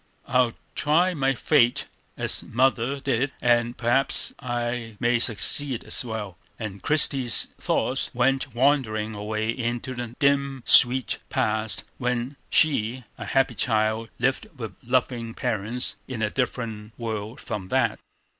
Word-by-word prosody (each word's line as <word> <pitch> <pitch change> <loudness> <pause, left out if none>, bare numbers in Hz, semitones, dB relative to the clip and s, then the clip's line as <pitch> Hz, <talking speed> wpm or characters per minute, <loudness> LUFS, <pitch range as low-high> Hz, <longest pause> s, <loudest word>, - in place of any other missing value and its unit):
I'll 125 -2 +2 0.2
try 170 +5 +2
my 135 -4 +1
fate 125 -3 +3 0.3
as - - 0
mother 130 +2 +1
did, 135 0 -1
and 120 0 +2
perhaps 120 +3 +2
I 120 -3 -3
may 120 0 +2
succeed 115 +4 +2
as - - -2
well." 105 -6 -6 0.2
And 100 -4 -6
Christie's 135 -5 +3
thoughts - - 0
went 135 0 0
wandering 120 -5 +1
away 110 +1 -2
into 120 +2 -3
the 120 -1 -6
dim, 140 -3 +1
sweet 125 -2 +5
past 110 0 -1 0.2
when 125 +2 -2
she, 130 -4 +3 0.2
a 110 - -5
happy 135 +5 +1
child, 110 -1 0
lived 135 - 0
with 110 -5 -6
loving 120 -2 -1
parents 110 +4 -2
in 120 -4 -4
a 105 - 0
different 115 -4 -3
world 110 -1 -5
from 100 -3 -5
that. - - +1
120 Hz, 130 wpm, -25 LUFS, 110-130 Hz, 0.3 s, sweet